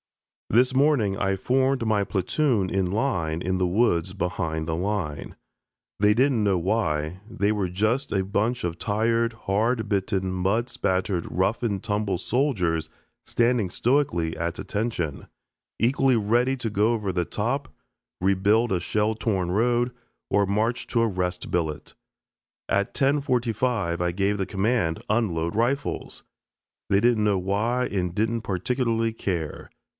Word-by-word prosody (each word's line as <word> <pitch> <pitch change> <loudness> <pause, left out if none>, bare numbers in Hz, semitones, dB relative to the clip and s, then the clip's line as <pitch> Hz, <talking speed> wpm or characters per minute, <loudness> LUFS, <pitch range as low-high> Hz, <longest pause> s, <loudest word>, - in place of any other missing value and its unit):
This 125 +4 +3
morning 130 -8 +3
I 95 -1 0
formed 130 +3 +1
my 105 -2 +2
platoon 100 - 0
in 95 0 0
line 90 -8 -1
in 95 +1 -1
the 90 -1 +1
woods 90 -3 +1
behind 85 -4 -2
the 80 - -1
line. 90 -5 -3 0.6
They 105 +1 +5
didn't 125 -1 +2
know 100 -3 +2
why. 85 -3 -1
They 100 +2 0
were 100 -4 -1
just 110 +9 0
a 95 -2 +1
bunch 110 +3 0
of 85 -1 -3
tired, 115 +4 +1
hard 110 +1 -1
bitten, 95 -2 0
mud 100 +7 0
spattered, 95 -2 -1
rough 100 +6 0
and 100 -5 -1
tumble 105 -3 -1
soldiers 90 - 0 0.4
standing 120 -4 +1
stoically 90 - +1
at 85 +1 -3
attention, 100 -9 -3 0.5
equally 130 +1 +3
ready 120 +5 +2
to 120 -3 -3
go 105 +2 +2
over 105 -5 -2
the 90 -1 +1
top, 120 +10 -2 0.5
rebuild 100 +4 +2
a 90 - 0
shell 105 +5 0
torn 95 -6 -1
road, 120 +4 +2 0.4
or 100 0 +3
march 110 +5 0
to 115 - +1
a 115 - +3
rest 90 -3 -3
billet. 80 -4 -2 0.7
At 100 +1 0
10:45 125 -9 0
I 90 0 +1
gave 100 +3 0
the 95 - -1
command: 95 -4 0
"Unload 85 -7 0
rifles!" 120 +5 -1 0.7
They 100 - +4
didn't 115 -1 +3
know 105 -2 +2
why 105 +7 0
and 90 -3 -2
didn't 110 +3 0
particularly 115 +3 -1
care. 85 -8 -4
105 Hz, 140 wpm, -25 LUFS, 90-115 Hz, 0.7 s, They